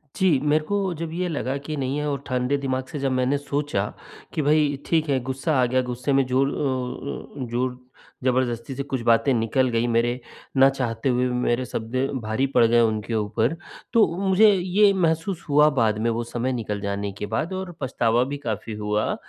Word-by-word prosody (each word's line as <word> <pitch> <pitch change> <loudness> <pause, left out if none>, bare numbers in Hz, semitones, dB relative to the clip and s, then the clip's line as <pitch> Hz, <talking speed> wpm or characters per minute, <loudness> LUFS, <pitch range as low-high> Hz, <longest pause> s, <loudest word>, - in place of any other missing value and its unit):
जी 175 -8 +3
मेरे 150 +1 +2
को 200 -2 -1
जब 165 0 -5
ये 180 +1 -1
लगा 140 -3 -2
कि 155 - -3
नहीं 135 +1 -1
है 150 0 -1
और 140 -1 -3
ठंडे 125 +2 0
दिमाग 130 -1 -2
से 145 - -4
जब 135 -1 0
मैंने 130 +2 +1
सोचा 145 -6 -2 0.5
कि 155 - 0
भई 150 0 +3
ठीक 160 -2 +1
है 135 -2 +2
गुस्सा 135 +4 -1
आ - - +4
गया, 130 +1 +1
गुस्से 125 +2 -2
में 135 0 +3
ज़ोर 130 +2 +2
अ 130 0 -4
अ, - - -3
ज़ोर 125 +1 -1 0.5
ज़बरदस्ती 125 0 0
से 140 - -3
कुछ 130 -3 -3
बातें 120 +4 +4
निकल 120 +3 +1
गईं, 115 +1 +1
मेरे 120 +2 +1 0.4
ना 135 +1 +7
चाहते 125 -2 -2
हुए 125 0 +2
मेरे 125 0 0
शब्द 115 +2 -5 0.3
भारी 110 +5 0
पड़ 125 -3 +4
गए 120 +1 +4
उनके 110 0 0
ऊपर। 110 +7 0 0.4
तो 225 -3 +6
मुझे 195 +2 +5
ये 195 +2 +3
महसूस 170 0 0
हुआ 150 +1 +6
बाद 110 -2 +2
में 115 +1 +1
वो 115 +1 -1
समय 120 +2 -2
निकल 105 -4 -3
जाने 100 0 -2
के - - -3
बाद 110 - -2
और 185 -1 -4
पछतावा 120 -2 +1
भी 140 +2 -4
काफ़ी 115 -4 -4
हुआ। 105 0 0
130 Hz, 200 wpm, -24 LUFS, 120-150 Hz, 0.5 s, ना